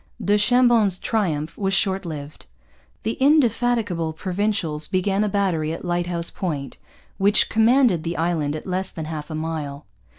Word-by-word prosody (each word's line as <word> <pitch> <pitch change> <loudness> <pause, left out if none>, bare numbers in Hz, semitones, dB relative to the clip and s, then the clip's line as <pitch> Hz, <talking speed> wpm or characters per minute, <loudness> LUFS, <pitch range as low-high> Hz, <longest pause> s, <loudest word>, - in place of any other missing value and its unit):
Du 205 -1 +2
Chambon's 230 -3 +4
triumph 165 -9 -1
was 195 -1 +1
short 195 -1 0
lived. 150 - -8 0.6
The 225 - -2
indefatigable 235 - +2
Provincials 180 -4 -1
began 195 +2 0
a 210 - 0
battery 180 -6 0
at 165 - -7
Lighthouse 175 -1 -1
Point, 150 -7 -4 0.4
which 200 +2 +4
commanded 225 - +4
the 170 +1 -4
island 160 -3 0
at 155 - -7
less 185 +1 -2
than 160 - -6
half 155 -1 -6
a 155 - -5
mile. 155 -3 -4
180 Hz, 145 wpm, -22 LUFS, 160-210 Hz, 0.6 s, Chambon's